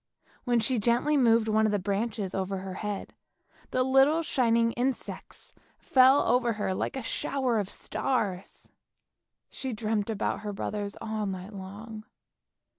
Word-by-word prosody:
When 240 -2 +3
she 235 +2 +1
gently 240 +7 +2
moved 230 -4 +4
one 220 0 +3
of - - 0
the 205 - +2
branches 200 0 -2
over 190 0 -2
her 190 0 -6
head, 205 +1 -5 0.6
the 255 - +1
little 270 +5 +4
shining 230 -5 +2
insects 250 +3 -4 0.2
fell 265 +2 +5
over 240 -1 +3
her 205 -3 -2
like - - -2
a 265 - -4
shower 250 -1 0
of 200 -2 -3
stars. 205 -9 -3 0.8
She 260 -2 -4
dreamt 215 -1 -1
about 220 - -1
her 210 -1 -5
brothers 205 0 -4
all 215 -1 -3
night 190 +2 -6
long. 210 +3 -8
220 Hz, 145 wpm, -28 LUFS, 205-250 Hz, 0.8 s, fell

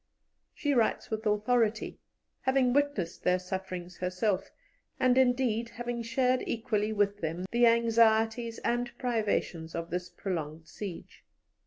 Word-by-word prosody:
She 290 -2 0
writes 235 -3 +1
with 220 0 -2
authority, 220 +1 +1 0.4
having 260 -2 +2
witnessed 280 -12 0
their 180 0 +3
sufferings 180 -1 -6
herself, 185 +2 -1 0.5
and, 255 -1 +4
indeed, 245 -3 +2
having 240 0 -4
shared 250 +2 +1
equally 220 -2 -1
with 205 -1 +1
them 165 +3 -3
the 240 0 +5
anxieties 230 0 +3
and 240 0 -1
privations 210 -9 -1
of 170 +1 -4
this 180 0 -3
prolonged 165 -3 -5
siege. 195 -2 -8
220 Hz, 125 wpm, -30 LUFS, 185-240 Hz, 0.5 s, the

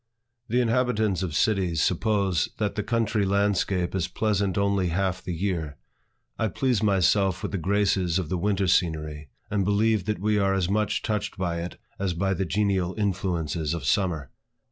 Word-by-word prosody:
The 125 +2 +2
inhabitants 115 -5 +1
of 85 -6 -3
cities 95 -4 +1
suppose 95 -2 +1
that 105 -2 -1
the 105 - -2
country 110 -1 0
landscape 100 -2 +1
is 95 -3 0
pleasant 100 -4 0
only 100 -2 +1
half 95 +2 -1
the 90 - -5
year. 80 -6 -2 0.6
I 110 - +2
please 125 +2 0
myself 95 -2 +2
with - - -3
the 100 - -2
graces 95 -2 +1
of 95 -4 -2
the 90 - -1
winter 100 +1 +1
scenery, 75 -4 0 0.2
and 100 -1 +1
believe 105 +1 +2
that 105 0 -1
we 105 +3 +1
are 95 -1 +2
as 95 -3 +1
much 105 0 0
touched 105 -2 -2
by 85 -2 -2
it 90 - -7 0.2
as 95 -3 -1
by 95 +3 0
the 95 0 -1
genial 95 -1 0
influences 85 -6 -1
of 85 - -5
summer. 85 - 0
95 Hz, 170 wpm, -26 LUFS, 90-105 Hz, 0.6 s, The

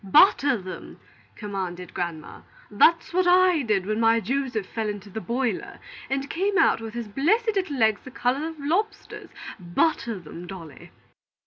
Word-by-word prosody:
"Butter 275 - +5
them!" 185 -2 -9 0.4
commanded 185 -4 -5
grandma. 170 -3 -5 0.3
"That's 335 +1 +4
what 365 0 +2
I 360 -2 +5
did 210 -7 0
when 215 +2 -1
my 230 0 +4
Joseph 245 -3 -2
fell 220 +1 -3
into 205 -1 -7
the 220 - -5
boiler 235 -3 -2 0.3
and 270 +1 -1
came 390 +6 0
out 320 - +4
with 225 0 -7
his 235 -2 -4
blessed 365 - +2
little 370 -8 -1
legs 220 -3 +3
the - - -9
color 260 +4 -1
of 325 - -7
lobsters. 350 +10 -2 0.3
Butter 215 - 0
them, 175 0 -10
Dolly." 165 -7 -10
230 Hz, 155 wpm, -25 LUFS, 195-310 Hz, 0.4 s, Butter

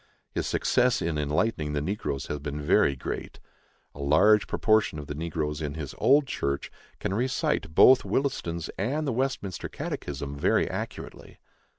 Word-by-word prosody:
"His - - -2
success 125 0 +2
in 80 -2 -1
enlightening 75 +1 0
the 75 - 0
negroes 75 -5 -3
has 75 - -4
been 75 +1 -5
very 75 -1 +3
great. 65 - -6 0.5
A - - -13
large 100 +10 +4
proportion 110 -7 +2
of 75 - -6
the 75 - -5
negroes 75 -1 -3
in 75 -1 -3
his 75 -5 -6
old 140 +2 +5
church 70 - -3 0.3
can - - -2
recite 120 -8 -1
both 130 0 +7
Williston's 85 - -2
and 140 +10 -1
the 135 - -1
Westminster 120 -7 -2
Catechism 70 0 -5
very 70 - +2
accurately." - - -7
80 Hz, 155 wpm, -27 LUFS, 75-110 Hz, 0.5 s, both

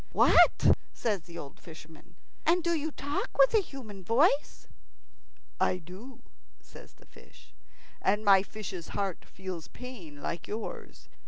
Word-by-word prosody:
"What?" - - +6 0.2
says 210 -6 -1
the 170 -1 -10
old 140 -4 -9
fisherman; 160 +1 -14 0.3
"and 345 +2 +3
do 340 0 +1
you 315 -1 -1
talk 285 -1 -4
with - - +6
a 440 - +5
human 225 - -10
voice?" 275 - +2 0.9
"I 185 - +2
do," 185 +10 -12 0.4
says - - -15
the - - -22
fish. - - -19 0.5
"And 210 +3 +1
my 195 -2 +7
fish's 190 -4 -7
heart 195 -3 -2
feels 185 -3 -7
pain 200 - -10
like 170 - -4
yours. 220 +2 -7
205 Hz, 140 wpm, -30 LUFS, 175-270 Hz, 0.9 s, my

